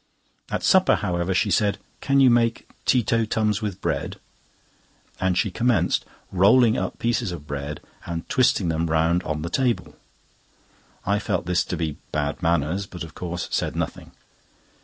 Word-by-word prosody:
At - - -2
supper, 190 -1 +5
however, 90 -2 -1
she 100 +2 +1
said: 100 0 +2 0.2
"Can 140 0 +2
you 130 -2 +6
make 115 -1 +1 0.2
tee 125 -2 +3
to 115 +1 +1
tums 105 -1 0
with 100 -3 -3
bread?" 80 -4 -2 1.0
and 95 -1 +1
she 95 +1 +1
commenced 110 -4 +1 0.3
rolling 110 +5 +5
up - - -3
pieces 115 -3 0
of 85 -4 -7
bread, 70 0 -5 0.3
and 85 -1 -4
twisting 115 -8 +2
them 80 +1 0
round 80 +2 +2
on 75 -3 -3
the 85 - -3
table. 125 0 0 1.1
I 100 +2 +2
felt 100 -4 -2
this 90 0 +1
to - - -3
be 80 -3 -3
bad 75 +2 -2
manners, 85 +3 0
but 90 - -7
of 80 - -10
course 90 -1 -4
said - - -1
nothing. - - -4
95 Hz, 160 wpm, -24 LUFS, 85-115 Hz, 1.1 s, you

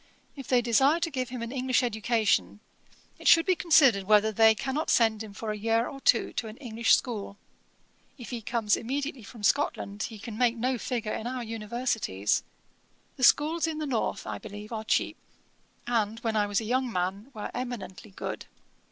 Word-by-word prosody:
If 275 -4 -9
they 245 -2 +3
desire 270 +7 +3
to 330 -1 -2
give 255 -2 -3
him 245 -2 -5
an 235 - -5
English 255 -1 +1
education, 220 -2 0 0.6
it - - -4
should 330 0 +7
be 370 - +3
considered 275 - +4
whether 210 +1 +4
they 220 +1 +5
cannot 275 +7 -2
send 225 -2 +3
him 220 -2 -7
for 215 +2 -5
a - - -3
year 225 +2 +1
or 275 -1 -9
two 235 - +3
to 225 - -1
an 215 +2 -9
English 230 -3 +3
school. 210 -5 -5 0.8
If 245 -2 -9
he 240 -2 -4
comes 220 -1 +1
immediately 275 +2 -4
from 225 0 -12
Scotland, 205 -4 0
he 220 - -9
can 220 +1 -8
make 240 -1 +2
no 250 +1 -1
figure 230 -3 -3
in 220 - -4
our 250 0 -4
Universities. 220 - -1 0.8
The 255 - -5
schools 315 +6 +4
in 320 -1 -3
the 310 - -3
north, 250 -6 -2
I 105 -1 -5
believe, 210 - -9
are 220 -1 -4
cheap; 220 - 0 0.7
and, 225 -2 0
when 225 -2 -1
I 210 -1 +2
was 205 -1 +1
a - - -5
young 255 +2 0
man, 190 +5 -2
were 210 - -5
eminently 245 -5 -6
good. 190 - -6
230 Hz, 190 wpm, -28 LUFS, 215-255 Hz, 0.8 s, should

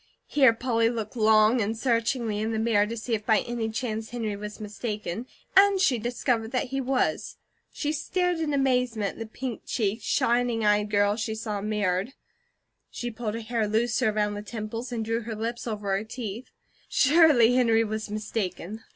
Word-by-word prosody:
Here 270 -5 +5
Polly 230 -1 +1
looked 225 -1 -4
long 220 +1 +4
and 220 +2 -1
searchingly 230 -2 0
in 220 +1 -1
the - - -1
mirror 220 -2 +2
to 230 +2 -5
see 230 +2 -4
if 215 -1 -1
by 220 -1 +3
any 235 -2 -3
chance 220 -1 -3
Henry 225 -4 -3
was 210 +1 -7
mistaken, 210 0 -5 0.3
and 395 0 +6
she 260 -10 +3
discovered 235 0 -1
he 270 +2 -1
was. 260 0 -1 0.3
She 295 - -2
stared 355 +3 -1
in 315 -2 -1
amazement 250 -6 +1
at - - -15
the 225 - -5
pink 245 +1 -5
cheeked, 220 -1 -1
shining 235 0 +1
eyed 210 0 +3
girl 205 0 +2
she 220 -1 -2
saw 215 -2 -4
mirrored. 205 +1 -1 0.8
She 240 0 -5
pulled 220 -1 -4
her 230 - -4
hair 225 -1 -1
looser 220 +1 +1
around 210 -1 0
the 205 - -5
temples, 225 +3 -6
and 225 -2 -2
drew 230 +1 -1
her 225 0 -5
lips 230 +3 -4
over 210 -3 -3
her 195 - -2
teeth. 225 0 -6 0.4
Surely 280 -5 +5
Henry 230 -3 +4
was 215 0 -4
mistaken. 210 -1 -4
225 Hz, 175 wpm, -26 LUFS, 215-245 Hz, 0.8 s, and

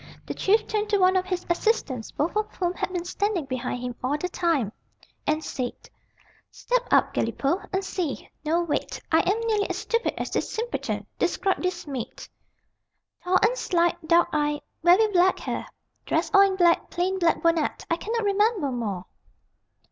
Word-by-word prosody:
The - - -4
Chief 435 +3 +2
turned 425 -1 -1
to 415 - +3
one 370 0 +4
of 370 0 +1
his 365 -1 -2
assistants, 340 - 0
both 315 +7 -2
of 425 0 0
whom 355 -1 0
had 370 - -3
been 350 -2 -3
standing 385 -3 -1
behind 255 -1 -3
him 250 -1 -3
all 275 +4 +1
the 360 +4 -3
time, 325 - 0 0.6
and 310 +1 +1
said: 250 -2 -3 0.8
"Step - - -1
out, - - +3
Galipaud, 350 +8 -1
and 385 0 -1
see. 340 -9 -3 0.2
No, 330 +3 +1
wait. 335 - -2
I 320 - +5
am 405 +4 +1
nearly 435 -3 0
as - - -2
stupid 465 0 -1
as - - -3
this - - -1
simpleton. 465 +2 -3
Describe 370 +2 +1
this 365 -1 -2
maid." 260 -5 -6 1.0
"Tall 365 +1 +3
and 455 +4 +4
slight, 345 -6 0
dark 340 +1 +4
eyed, 295 0 0 0.2
very 360 +6 +6
black 370 0 +4
hair. - - -4 0.4
Dressed - - 0
all 395 - +8
in 395 -1 +4
black, 345 -2 +3
plain 370 +2 -1
black 340 -2 +2
bonnet. 335 -2 +1
I - - +4
cannot 455 +4 -2
remember 405 - +2
more." 205 -7 -3
355 Hz, 175 wpm, -25 LUFS, 305-400 Hz, 1.0 s, all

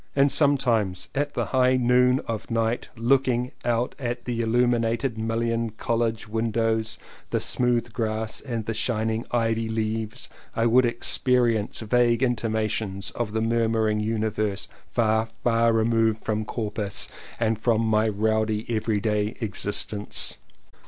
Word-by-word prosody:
And 140 0 +4
sometimes 120 - +2
at 145 +1 -2
the - - 0
high 130 0 +4
noon 125 +1 +4
of 115 -2 -4
night 115 0 -1
looking 125 +1 +1
out 120 0 0
at 120 -2 -3
the 120 -2 -1
il 115 - -1
lumined 120 +1 +1
mullioned 115 0 -1
College 115 -2 -1
windows, 110 0 0 0.3
the - - 0
smooth 120 -2 +1
grass 110 -1 -2
and 115 -5 -4
the 115 - -2
shining 110 0 -1
ivy 115 -1 0
leaves, 110 0 -3 0.3
I 115 - +1
would 120 +2 +5
experience 120 -2 +1
vague 120 +2 +2
intimations 110 -4 -1
of 115 -3 -3
the 110 - 0
murmuring 115 -1 +1
Universe 105 -2 -1 0.2
far, 110 -1 +1 0.2
far 115 -1 +3
removed 115 -1 +2
from 110 0 -1
Corpus 105 -3 -3 0.3
and 110 -2 +1
from 115 -1 +2
my 110 -1 +2
rowdy 110 +1 0
every 110 -1 0
day 105 0 0
existence. 105 -1 -1
115 Hz, 130 wpm, -25 LUFS, 110-120 Hz, 0.3 s, would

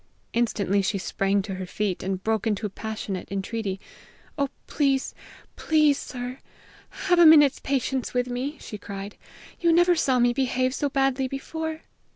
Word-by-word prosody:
Instantly 205 -4 +1
she 195 +1 0
sprang 195 +1 0
to 195 -1 -5
her 185 0 -5
feet, 200 -1 -2
and 190 0 -3
broke 220 -1 0
into 210 0 0
passionate 205 -2 -5
entreaty. 195 0 -3 0.6
"Oh, 280 -1 0 0.2
please, 275 -2 0 0.4
please, 305 -3 +3
sir, 250 0 -6 0.5
have 355 -1 +1
a 345 - +8
minute's 295 -3 +7
patience 265 -1 -1
with 250 0 0
me," 255 +5 -3
she 210 - -8
cried; 200 0 -7 0.4
"you 340 -1 +3
never 350 +1 +5
saw 265 -5 +2
me 240 0 +3
behave 255 0 0
so 285 +1 -1
badly 270 -1 +1
before!" 315 +4 -5
250 Hz, 155 wpm, -25 LUFS, 205-280 Hz, 0.6 s, a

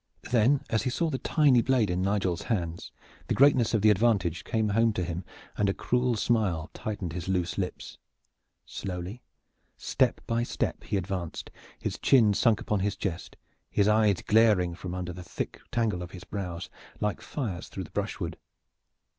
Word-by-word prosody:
Then 125 +4 +4
as 110 - +2
he - - -1
saw 160 +6 0
the 130 - -2
tiny 145 -6 +4
blade 120 -6 +2
in 90 +1 0
Nigel's 95 -3 0
hand 85 -7 -2 0.4
the - - 0
greatness 130 -4 +5
of 105 - +1
the 110 - +7
advantage 95 -6 +2
came 110 -2 0
home 115 +2 +3
to 90 - -1
him, 85 +1 -4 0.3
and 100 -1 +1
a 100 - 0
cruel 125 -1 +1
smile 95 -9 0
tightened 100 -6 -4
his 90 0 -5
loose 90 -2 0
lips. 90 -2 -5 0.7
Slowly, 95 +5 -5 0.6
step - - +1
by 115 0 0
step 120 - -2
he 105 - 0
advanced, 90 -3 -4 0.3
his - - -4
chin 115 -6 +5
sunk 110 +1 +3
upon 105 - -1
his 100 +2 0
chest, 90 -3 -4 0.3
his 100 - +2
eyes 105 -3 +3
glaring 105 -6 +4
from 90 +1 -6
under 90 -1 -4
the 90 - -8
thick 90 - -5
tangle 115 -6 0
of 90 - -6
his 90 -2 -9
brows 90 -2 -5 0.3
like 105 +1 -1
fires 110 - -4
through - - -5
the - - -12
brushwood. - - -3
100 Hz, 170 wpm, -28 LUFS, 90-115 Hz, 0.7 s, the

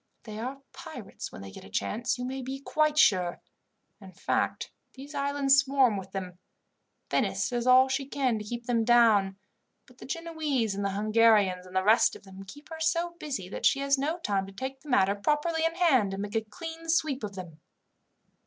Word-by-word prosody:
They 215 -2 -8
are 265 +4 -6
pirates 265 - -9
when 95 - -10
they 95 - -9
get - - -11
a 95 - -13
chance, 220 - -2
you 250 - -4
may 265 +1 -4
be 265 +2 -5
quite 305 +2 0
sure. 180 -9 +3 0.6
In 190 -1 -12
fact, - - -2 0.2
these 275 +3 -11
islands 280 -1 +2
swarm 270 -5 +3
with 190 -1 -7
them. 185 -2 -6 0.7
Venice - - 0
does 240 0 -2
all 255 +1 +7
she 270 0 -2
can 260 -5 0
to - - -6
keep 240 +3 -6
them 235 -2 +1
down, 220 -5 +4 0.5
but 250 0 -21
the - - -10
Genoese, 305 -9 -2
and 200 +1 -3
the 200 - 0
Hungarians, 210 -3 +3
and 185 - -13
the 185 - +2
rest 220 +4 +4
of - - -13
them, 190 0 -11
keep 290 +9 -13
her 320 -1 -8
so 335 +2 0
busy 265 -12 -4
that - - +1
she 275 - +2
has 275 0 +2
no 305 +5 -1
time 200 - -1
to - - -10
take 265 +5 -6
the 300 - -13
matter 200 -6 +3
properly 300 +9 0
in 330 0 0
hand, 260 - +3
and 200 - -4
make 205 +1 -6
a 225 - +2
clean 325 +10 -9
sweep 310 -6 +1
of 200 -2 -5
them." 170 -4 -9
245 Hz, 205 wpm, -28 LUFS, 200-280 Hz, 0.7 s, all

